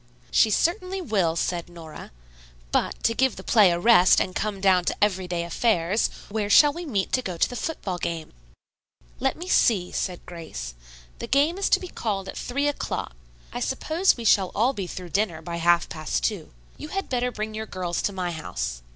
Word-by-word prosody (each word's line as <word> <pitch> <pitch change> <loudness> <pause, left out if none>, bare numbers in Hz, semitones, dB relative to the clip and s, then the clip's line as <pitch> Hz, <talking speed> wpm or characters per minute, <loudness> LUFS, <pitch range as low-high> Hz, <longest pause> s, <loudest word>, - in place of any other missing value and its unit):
"She 220 - +5
certainly 365 - 0
will," 195 - 0
said 170 0 -2
Nora. 165 -3 -10 0.6
"But, - - -1
to 230 - +3
give 265 +2 +1
the - - -9
play 210 -5 +5
a 170 - +1
rest 185 -3 +6
and 185 - -1
come 205 0 -2
down 190 -2 +4
to - - 0
everyday 185 -4 0
affairs, 180 +2 +1 0.2
where 205 0 -2
shall 295 +6 +7
we 345 +1 -6
meet 200 -8 -1
to 255 - +2
go 185 -7 -5
to - - +3
the 245 - -8
football 205 - -4
game?" 165 -2 -4 0.9
"Let - - 0
me 350 +3 -7
see," 200 - +3
said 180 -2 -3
Grace. - - -7 0.5
"The - - -5
game 300 +7 +2
is 400 - +1
to - - +4
be 370 - -7
called 200 - -3
at - - -7
three 280 +4 -1
o'clock. 290 - -3 0.4
I - - -3
suppose 340 +2 +1
we 235 - -6
shall 195 -3 +4
all 240 +6 +2
be 195 -7 -4
through 180 0 -7
dinner 190 -4 0
by 170 +1 -5
half 170 0 +3
past 155 - -3
two. - - -2 0.3
You - - -7
had 390 +5 -3
better 250 -1 0
bring 215 -1 -5
your 220 0 -5
girls 180 -3 -3
to - - 0
my 180 -2 -3
house. - - -4
195 Hz, 200 wpm, -25 LUFS, 175-245 Hz, 0.9 s, shall